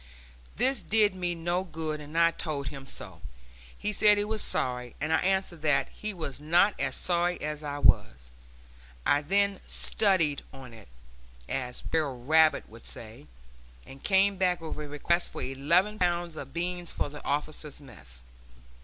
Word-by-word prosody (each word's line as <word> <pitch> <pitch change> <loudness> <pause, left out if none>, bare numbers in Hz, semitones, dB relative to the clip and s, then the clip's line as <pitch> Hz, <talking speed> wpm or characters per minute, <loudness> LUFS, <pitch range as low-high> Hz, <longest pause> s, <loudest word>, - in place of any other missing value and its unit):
This 260 -3 +2
did 210 0 +3
me 180 -2 -2
no 175 +2 -1
good, 155 -4 -4
and 150 +2 -7
I 170 0 +6
told 145 -4 -3
him 135 -2 -9
so. 95 -10 -5 0.6
He 210 - -2
said 210 0 +6
he 205 - +2
was 215 0 -2
sorry, 125 -1 -2
and 150 +2 0
I - - +5
answered 190 -3 0
that 145 -3 +2
he 215 - -6
was 160 -8 -6
not 175 +7 +4
as - - -1
sorry 175 0 0
as 150 0 -4
I 145 -1 -3
was. - - +2 0.7
I 145 - +4
then 200 +5 +1
"studied 170 -9 +2
on 130 -3 -11
it," 110 -2 -13 0.6
as 125 -2 -4
Br'r 155 -5 0
Rabbit 155 +4 +4
would 115 +1 -14
say, 115 +6 -9 0.6
and 135 0 -12
came 195 0 +4
back 180 -1 +2
with 160 -1 -5
a 150 -1 -6
request 170 +4 0
for - - -4
eleven 150 +10 +2
hundred 190 -4 +2
pounds 175 -1 -2
of 135 -3 -7
beans 175 +1 -3
for - - -2
the 145 0 -10
officers' 150 0 -3
mess. 65 - -10
160 Hz, 170 wpm, -29 LUFS, 140-180 Hz, 0.7 s, I